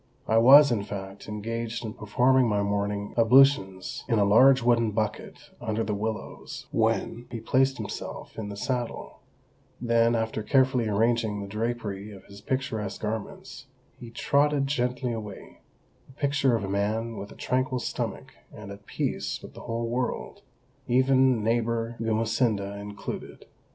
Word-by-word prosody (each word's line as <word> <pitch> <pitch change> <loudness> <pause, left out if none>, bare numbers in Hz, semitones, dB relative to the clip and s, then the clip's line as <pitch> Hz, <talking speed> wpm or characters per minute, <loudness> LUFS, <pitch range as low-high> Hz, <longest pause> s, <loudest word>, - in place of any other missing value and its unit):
I 110 0 +4
was, 140 +4 +8
in 115 -4 +1
fact, 100 -1 -7
engaged 115 +2 -4
in 110 - -5
performing 125 +5 +2
my 105 -1 +1
morning 100 0 -2
ablutions 115 -6 +4
in 115 - +2
a 100 - +4
large 130 +5 +6
wooden 120 -2 +3
bucket 105 0 -4
under 115 -1 -1
the 105 - -2
willows 110 +1 -5
when 120 +1 0
he 120 - -5
placed 130 +4 +2
himself 105 -3 -7
in 105 -2 -5
the 100 - -7
saddle; 125 +1 -4 0.6
then, 115 -1 +2
after 115 -1 -1
carefully 130 0 +2
arranging 110 0 +1
the 100 - -6
drapery 105 -1 -4
of 95 -1 -13
his 100 0 -13
picturesque 110 -5 -3
garments, 110 +5 -6 0.3
he 120 - -9
trotted 140 +4 +1
gently 125 -2 -1
away, 105 -3 -8 0.5
the 135 - -17
picture 140 -3 +1
of 110 - -2
a - - -3
man 110 +4 -1
with 100 - -7
a - - -12
tranquil 130 +1 -1
stomach 125 - -4 0.2
and 105 -2 -10
at 100 0 -12
peace - - -2
with - - -11
the - - -11
whole 115 0 -3
world, 125 +2 -3 0.5
even 130 -2 +3
neighbour 115 +1 0
Gumesinda 110 -2 0
included. 100 0 -7
115 Hz, 150 wpm, -27 LUFS, 105-125 Hz, 0.6 s, was